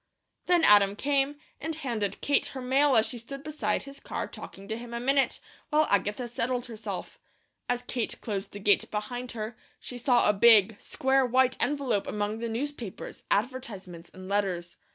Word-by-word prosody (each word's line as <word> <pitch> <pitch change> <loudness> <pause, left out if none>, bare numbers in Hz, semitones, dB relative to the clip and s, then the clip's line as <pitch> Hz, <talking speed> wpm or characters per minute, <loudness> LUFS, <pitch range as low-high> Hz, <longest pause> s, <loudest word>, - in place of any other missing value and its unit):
Then 350 -2 +4
Adam 200 -1 +6
came, 280 +3 +1 0.2
and 320 +1 -3
handed 225 -9 -3
Kate 285 - +2
her 265 - -7
mail 270 +2 +3
as 220 - +5
she 245 - -5
stood 275 +4 -8
beside 295 -10 -1
his 275 0 -10
car - - -4
talking 195 +1 -10
to 220 - -3
him 235 +1 -7
a - - -2
minute, 275 +2 +2 0.3
while 310 0 +4
Agatha 210 +4 +1
settled 240 +1 -2
herself. 225 -3 -6 0.5
As 245 0 0
Kate 245 -2 -3
closed 200 -2 -4
the - - -8
gate 205 0 +3
behind 245 +4 -4
her, 220 0 -5 0.2
she 245 - -7
saw 245 -1 +4
a 210 - +5
big, 215 0 +6
square 265 0 +2
white 255 +1 +3
envelope 270 -8 0
among 210 +1 -2
the 235 0 -3
newspapers, 240 -3 -5
advertisements, 200 -7 -3
and 185 0 -10
letters. 185 -4 -1
235 Hz, 175 wpm, -28 LUFS, 210-265 Hz, 0.5 s, Adam